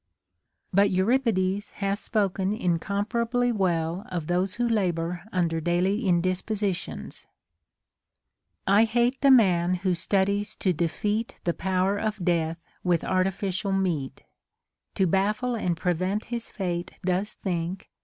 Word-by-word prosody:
But 200 +2 +5
Euripides 200 -1 +1
hath 200 0 -1
spoken 195 -3 0
incomparably 225 +6 0
well 175 -3 0
of 170 -4 -3
those 180 +3 0
who 240 0 0
labor 175 -5 0
under 165 -4 0
daily 185 +6 +1
indispositions: 185 +2 -1 0.7
— - - -62 0.7
I 205 +3 +6
hate 240 +3 +1
the 275 - +5
man 185 -8 +5
who 185 0 0
studies 200 +3 0
to 185 - +1
defeat 205 +7 -1
The 170 - +1
power 190 +3 0
of 215 -4 -2
death 165 -1 0 0.2
with 175 -2 +2
artificial 190 +1 0
meat, 165 -9 -1 0.7
To 190 - +3
baffle 210 +7 +1
and 180 -7 -1
prevent 185 +4 -1
his 235 -1 -4
fate 175 -3 -3
does 190 +3 0
think. 180 +1 -4
190 Hz, 125 wpm, -26 LUFS, 175-210 Hz, 0.7 s, I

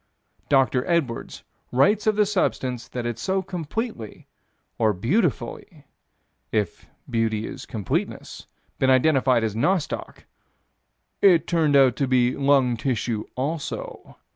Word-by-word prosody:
Dr. 135 -2 +3
Edwards 160 -9 -2 0.3
writes 200 - +3
of 215 - +3
the 210 0 +3
substance 130 - -1
that 125 -1 -5
had 120 -1 -3
so 190 +8 -1
completely, 180 - -5 0.5
or 110 -2 +3
beautifully 140 - -2 0.7
if 105 -2 -2 0.2
beauty 115 -2 -1
is - - -8
completeness 105 -5 -4 0.3
been 130 - +3
identified 130 -3 +3
as 110 -2 -1
nostoc 170 - -1 1.0
"It 180 -5 +5
turned 160 -4 +2
out 135 -3 +5
to 140 - 0
be 125 -1 +2
lung 135 -4 +3
tissue 115 -3 -2
also." 145 +4 -5
130 Hz, 115 wpm, -24 LUFS, 120-170 Hz, 1.0 s, It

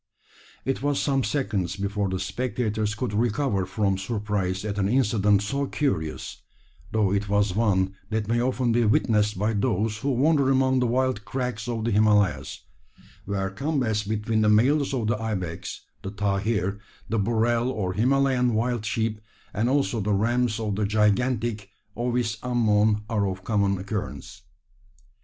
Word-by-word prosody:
It 135 -1 -1
was 145 0 0
some 135 -2 +1
seconds 105 - -1
before 100 0 -2
the 95 - -2
spectators 105 0 -2
could 120 -1 -3
recover 110 -3 0
from 95 -1 0
surprise 100 -2 -2
at 105 -1 -3
an 100 0 +1
incident 105 -5 +3
so 140 +6 -1
curious, 80 - -2 0.5
though 105 -3 +2
it 100 0 -1
was 100 -2 +2
one 95 -4 +2 0.2
that 110 -1 -1
may 120 +1 +1
often 125 -1 +1
be 120 +1 +3
witnessed 105 -1 +2
by 105 +4 0
those 105 0 0
who 140 - -2
wander 140 +1 +3
among 130 -1 +3
the 125 - +2
wild 130 -3 0
crags 125 0 -3
of 115 -2 -2
the 115 - +1
Himalayas 105 -2 +2 0.6
where 95 -1 -2
combats 120 -2 0
between 110 +1 -1
the 105 - +4
males 135 +7 +3
of 125 -5 -1
the 110 0 0
ibex, 95 -7 -4 0.2
the 95 - -5
tahir, 100 0 -1 0.3
the 115 - 0
burrell 115 +3 +1
or 100 -7 -2
Himalayan 125 +1 +2
wild 120 0 0
sheep, 110 -1 -1 0.3
and 110 +4 0
also 135 -4 +1
the 105 0 0
rams 120 +2 +1
of 105 -3 -2
the 105 - +1
gigantic 110 +1 +1 0.3
Ovis 120 -2 -1
ammon, 110 -4 +2
are 105 -3 0
of 95 0 -6
common 100 -2 +1
occurrence. 100 +2 -5
110 Hz, 155 wpm, -25 LUFS, 100-120 Hz, 0.6 s, the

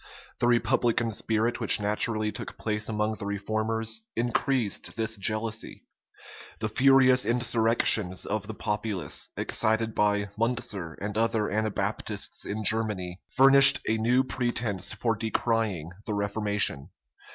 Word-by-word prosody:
The 120 - +2
republican 120 -1 +1
spirit 110 +3 -1
which 115 - +4
naturally 105 +1 0
took - - -7
place 105 0 -2
among 105 0 -2
the 100 - -5
reformers, 110 +2 -2
increased 120 -1 -1
this 110 0 -1
jealousy. 110 +2 -3 0.8
The 110 - -2
furious 130 +1 +4
insurrections 115 -4 +2
of 105 -1 -3
the 110 - -7
populace, 105 -8 -3
excited 110 0 0
by 105 -1 0
Muncer 115 -8 -2
and 105 +1 -4
other 115 -2 0
Anabaptists 110 -1 -3
in 110 +1 -4
Germany,[*] 100 -5 -2
furnished 135 +1 +8
a 110 0 0
new 125 +4 +2
pretence 120 -6 -2
for 115 -2 -1
decrying 110 -6 -2 0.2
the 105 - -2
reformation. 100 -7 0
110 Hz, 120 wpm, -27 LUFS, 105-115 Hz, 0.8 s, furnished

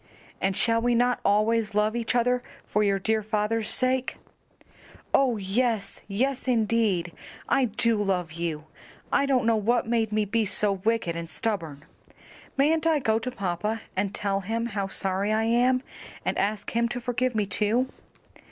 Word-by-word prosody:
"And 190 0 0
shall 230 -1 +2
we 240 0 +2
not 245 +1 +2
always 215 +1 +2
love 210 +2 +2
each 235 +1 -1
other 245 +1 +2 0.2
for 210 - +1
your 200 -1 +2
dear 220 +3 0
father's 215 +1 -1
sake?" 255 0 0 1.0
"Oh, 255 -4 +3
yes, 210 +2 -1
yes, 255 +7 -1
indeed! 220 -7 +1 0.4
I 270 - +3
do 225 -1 +1
love 180 -5 -1
you! 160 -2 -3 0.5
I 280 - +3
don't 255 -4 +2
know 230 0 +4
what 235 +3 +1
made 225 -2 +1
me 215 0 +1
be 225 +3 +1
so 205 0 +2
wicked 195 -3 -1
and 170 0 -5
stubborn. 165 -11 -3 0.7
Mayn't 315 +3 +3
I 320 -2 +4
go 225 -5 +1
to 230 - -4
papa 210 -1 -2
and 190 +1 0
tell 200 -1 -1
him 225 +4 -2
how 200 -1 -1
sorry 195 +1 0
I 220 +1 +2
am, 250 +3 +2 0.4
and - - 0
ask 205 +1 -1
him 235 0 +1
to 245 - -3
forgive 245 0 -1
me 210 -2 +1
too?" 215 +6 +1
220 Hz, 165 wpm, -26 LUFS, 200-240 Hz, 1.0 s, know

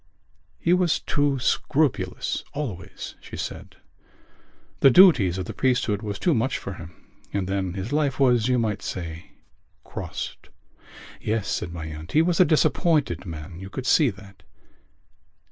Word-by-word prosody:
"He 170 - +2
was 180 -3 +2
too 145 -1 0
scrupulous 140 +2 0
always," 110 -12 -5
she - - -9
said. - - -6 1.0
"The 135 - +7
duties 125 - +6
of 95 - -3
the - - -6
priesthood 120 -5 +1
was 105 -3 -4
too 175 - +2
much 125 +2 0
for 100 - -6
him. 80 -2 -9 0.4
And 95 -2 -2
then 95 -2 -1
his 100 +7 -4
life 145 -3 +1
was, 125 -4 +4
you 125 -1 +2
might 110 -3 -1
say, 85 -2 -6 0.5
crossed." - - -7 0.7
"Yes," 110 -1 -1
said 85 - -2
my 85 -2 -6
aunt. 80 +1 -8
"He 155 - +5
was 170 0 +1
a 185 - +8
disappointed 150 - +2
man. 85 +1 -8
You 95 +1 -8
could 125 +5 -6
see 150 -1 +4
that." 100 -1 -12
110 Hz, 150 wpm, -25 LUFS, 95-145 Hz, 1.0 s, a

